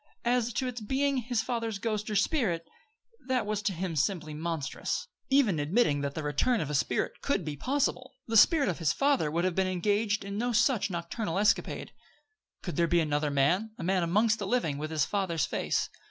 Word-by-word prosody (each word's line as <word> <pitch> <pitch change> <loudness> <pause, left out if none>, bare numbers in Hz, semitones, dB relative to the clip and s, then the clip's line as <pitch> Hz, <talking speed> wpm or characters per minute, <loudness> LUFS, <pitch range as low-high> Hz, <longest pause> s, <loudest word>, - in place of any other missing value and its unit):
As 240 -1 +2
to 260 - -1
its 245 -2 -5
being 270 +5 0
his 240 -2 -1
father's 230 -3 -2
ghost 215 0 -2
or 210 - -2
spirit, 195 - +1 0.6
that 255 -4 +1
was 210 -1 -2
to 205 - 0
him 180 -1 -3
simply 155 +1 -1
monstrous. 160 -2 -3 0.2
Even 255 - +3
admitting 145 -1 +2
that 140 0 -3
the 155 - -3
return 150 - +1
of 150 -5 -3
a - - -3
spirit 140 - -1
could 200 - 0
be 150 -2 -4
possible, 255 - -1
the 225 - -3
spirit 295 - +6
of 180 -3 -2
his 165 -3 +2
father 275 - +2
would 170 +3 -1
have 185 - +1
been 190 +1 +1
engaged 205 +3 0
in 200 +1 -4
no 245 +1 0
such 230 -2 +2
nocturnal 170 +2 -3
escapade. 205 +1 +1 0.7
Could 175 - -5
there 170 -1 +3
be 175 +1 +3
another 150 -1 0
man 175 +11 +1
a - - -6
man 185 +1 +1
amongst 210 +6 +2
the - - -3
living 165 - 0
with 155 +1 -4
his 155 -4 +1
father's 185 -7 0
face? - - -1
200 Hz, 200 wpm, -29 LUFS, 165-235 Hz, 0.7 s, spirit